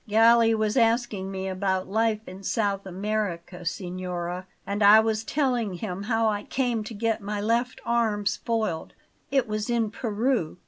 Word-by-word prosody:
Galli 225 Hz, +1 st, +5 dB
was 215 Hz, +2 st, 0 dB
asking 225 Hz, -5 st, +1 dB
me 190 Hz, 0 st, -4 dB
about 190 Hz, 0 st, -1 dB
life 220 Hz, +1 st, +1 dB
in 185 Hz, +1 st, -9 dB
South 200 Hz, -1 st, -1 dB
America, 190 Hz, -2 st, -3 dB
signora; 180 Hz, 0 st, -4 dB, 0.2 s
and 200 Hz, +1 st, -3 dB
I 210 Hz, +2 st, +9 dB
was 220 Hz, 0 st, 0 dB
telling 245 Hz, -7 st, 0 dB
him 180 Hz, 0 st, -5 dB
how 225 Hz, +1 st, +1 dB
I 205 Hz, -1 st, 0 dB
came 240 Hz, -2 st, -1 dB
to 220 Hz, -, -7 dB
get 225 Hz, +1 st, 0 dB
my 205 Hz, +1 st, -3 dB
left 235 Hz, +4 st, 0 dB
arm 225 Hz, -3 st, +1 dB
spoiled. 215 Hz, -7 st, -1 dB, 0.4 s
It 270 Hz, -3 st, +2 dB
was 215 Hz, +1 st, -3 dB
in 230 Hz, -3 st, +1 dB
Peru. 225 Hz, -6 st, -1 dB
215 Hz, 155 wpm, -26 LUFS, 190-230 Hz, 0.4 s, I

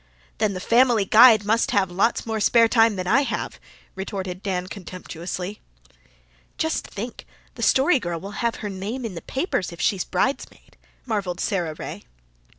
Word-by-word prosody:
"Then 215 Hz, -2 st, +1 dB
the -, -, -4 dB
Family 235 Hz, 0 st, +3 dB
Guide 220 Hz, +1 st, +7 dB
people 205 Hz, -, -11 dB
must 230 Hz, -, +1 dB
have 190 Hz, -3 st, +1 dB
lots 195 Hz, +6 st, +1 dB
more 220 Hz, -1 st, -2 dB
spare 230 Hz, +2 st, +5 dB
time 225 Hz, -2 st, +4 dB
than 185 Hz, -1 st, -4 dB
I 270 Hz, +10 st, +4 dB
have," 285 Hz, -, -4 dB, 0.3 s
retorted 190 Hz, -1 st, -5 dB
Dan 185 Hz, -3 st, -2 dB
contemptuously. 185 Hz, +1 st, -7 dB, 1.0 s
"Just 320 Hz, 0 st, -1 dB
think, 230 Hz, +4 st, -7 dB, 0.3 s
the -, -, -10 dB
Story 275 Hz, +2 st, +4 dB
Girl 170 Hz, -5 st, -4 dB
will 195 Hz, +4 st, -8 dB
have 235 Hz, -1 st, 0 dB
her -, -, -2 dB
name 210 Hz, +7 st, -5 dB
in 220 Hz, -, -5 dB
the 165 Hz, -, -7 dB
papers 265 Hz, -, -2 dB
if 170 Hz, -, -11 dB
she's 185 Hz, +2 st, +1 dB
bridesmaid," 265 Hz, +10 st, -3 dB, 0.3 s
marvelled 200 Hz, -7 st, -2 dB
Sara 175 Hz, -6 st, -1 dB
Ray. 105 Hz, -, -7 dB
200 Hz, 165 wpm, -23 LUFS, 185-230 Hz, 1.0 s, Guide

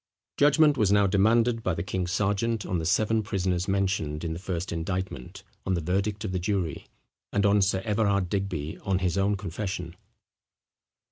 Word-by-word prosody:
Judgment 150 Hz, 0 st, +4 dB
was 105 Hz, -3 st, +3 dB
now 100 Hz, 0 st, +5 dB
demanded 115 Hz, +4 st, +3 dB
by 95 Hz, -5 st, -1 dB
the 85 Hz, -, -3 dB
king's 90 Hz, -1 st, -2 dB
sergeant 105 Hz, +2 st, 0 dB
on 90 Hz, -, -1 dB
the 80 Hz, -, -2 dB
seven 110 Hz, +4 st, +2 dB
prisoners 95 Hz, -3 st, -1 dB
mentioned 95 Hz, -6 st, -1 dB
in 80 Hz, -1 st, -2 dB
the 80 Hz, -, -6 dB
first 90 Hz, 0 st, -4 dB
indictment, 85 Hz, -5 st, -4 dB, 0.2 s
on 95 Hz, -, 0 dB
the -, -, 0 dB
verdict 100 Hz, +6 st, -1 dB
of 100 Hz, -, -3 dB
the 90 Hz, -, -1 dB
jury; 90 Hz, -4 st, -2 dB, 0.4 s
and 100 Hz, 0 st, +1 dB
on 100 Hz, 0 st, +4 dB
Sir 95 Hz, 0 st, +1 dB
Everard 100 Hz, -3 st, +1 dB
Digby, 90 Hz, -6 st, -3 dB
on 95 Hz, -1 st, 0 dB
his 90 Hz, -2 st, 0 dB
own 100 Hz, +1 st, +1 dB
confession. 95 Hz, -2 st, -5 dB
95 Hz, 175 wpm, -27 LUFS, 90-105 Hz, 0.4 s, now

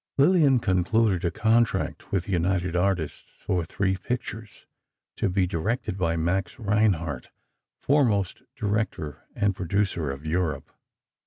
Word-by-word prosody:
Lillian 145 Hz, -2 st, +5 dB
concluded 95 Hz, -1 st, +2 dB
a 85 Hz, -, +2 dB
contract 110 Hz, +3 st, +1 dB
with 95 Hz, -3 st, 0 dB
the -, -, -5 dB
United 90 Hz, 0 st, 0 dB
Artists 90 Hz, -3 st, -1 dB
for 90 Hz, -2 st, -1 dB
three 95 Hz, +3 st, -1 dB
pictures, 115 Hz, -1 st, -5 dB, 0.5 s
to -, -, +1 dB
be 95 Hz, 0 st, +2 dB
directed 95 Hz, +7 st, -2 dB
by 85 Hz, -3 st, 0 dB
Max 85 Hz, +2 st, -1 dB
Reinhardt, 100 Hz, -, 0 dB, 0.5 s
foremost 115 Hz, -10 st, +1 dB
director 100 Hz, -8 st, -2 dB
and 100 Hz, -2 st, +1 dB
producer 90 Hz, -4 st, -1 dB
of 70 Hz, +2 st, -6 dB
Europe. 85 Hz, 0 st, -1 dB
95 Hz, 125 wpm, -26 LUFS, 85-110 Hz, 0.5 s, Lillian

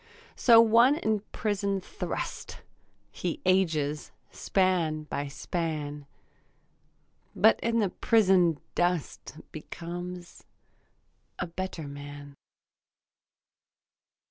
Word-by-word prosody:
So 230 Hz, -2 st, +6 dB
one 230 Hz, +4 st, +6 dB
in 220 Hz, -9 st, 0 dB
prison 200 Hz, -2 st, -1 dB
thrust; -, -, -6 dB, 0.5 s
He 175 Hz, -, -4 dB
ages 160 Hz, -6 st, +1 dB, 0.2 s
span 175 Hz, -5 st, 0 dB
by 145 Hz, -1 st, -4 dB
span, 150 Hz, -1 st, -4 dB, 1.3 s
But 220 Hz, +4 st, +5 dB
in 230 Hz, 0 st, 0 dB
the 210 Hz, -4 st, +2 dB
prison 185 Hz, -8 st, +3 dB
dust 175 Hz, -3 st, -2 dB
Becomes 175 Hz, +3 st, -8 dB, 0.9 s
a -, -, -2 dB
better 175 Hz, -2 st, -5 dB
man. 145 Hz, 0 st, -9 dB
175 Hz, 80 wpm, -28 LUFS, 155-200 Hz, 1.3 s, So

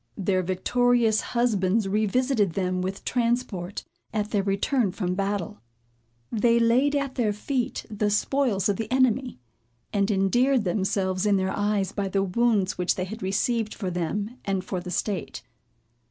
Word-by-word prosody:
Their 190 Hz, -2 st, +1 dB
victorious 225 Hz, +5 st, +2 dB
husbands 220 Hz, -4 st, +1 dB
re 210 Hz, +2 st, +1 dB
visited 240 Hz, -4 st, +1 dB
them 185 Hz, -1 st, -1 dB
with 190 Hz, +2 st, -4 dB
transport, 235 Hz, -6 st, -1 dB, 0.3 s
at 210 Hz, -1 st, -2 dB
their 205 Hz, -, +2 dB
return 200 Hz, +3 st, +1 dB
from 180 Hz, -2 st, -2 dB
battle. 200 Hz, +1 st, -2 dB, 0.7 s
They 230 Hz, +1 st, +3 dB
laid 245 Hz, +5 st, +3 dB
at 280 Hz, -2 st, -1 dB
their 235 Hz, -5 st, +1 dB
feet 245 Hz, +4 st, -2 dB
the 210 Hz, -1 st, -1 dB
spoils 210 Hz, -2 st, +1 dB
of 200 Hz, -2 st, 0 dB
the 225 Hz, -, -4 dB
enemy, 255 Hz, -, +2 dB, 0.6 s
and 200 Hz, 0 st, +1 dB
endeared 240 Hz, +6 st, +2 dB
themselves 190 Hz, 0 st, 0 dB
in 200 Hz, -1 st, +4 dB
their 190 Hz, 0 st, -1 dB
eyes 205 Hz, -2 st, 0 dB
by 200 Hz, -1 st, -2 dB
the 195 Hz, 0 st, 0 dB
wounds 200 Hz, -1 st, +1 dB
which 180 Hz, -, +1 dB
they 185 Hz, -, -2 dB
had 220 Hz, +5 st, -8 dB
received 215 Hz, +3 st, 0 dB
for 190 Hz, -4 st, -3 dB
them 200 Hz, +8 st, -3 dB
and 195 Hz, -2 st, -1 dB
for 185 Hz, -, -3 dB
the 180 Hz, -, -7 dB
state. 190 Hz, +2 st, -3 dB
205 Hz, 155 wpm, -26 LUFS, 190-235 Hz, 0.7 s, in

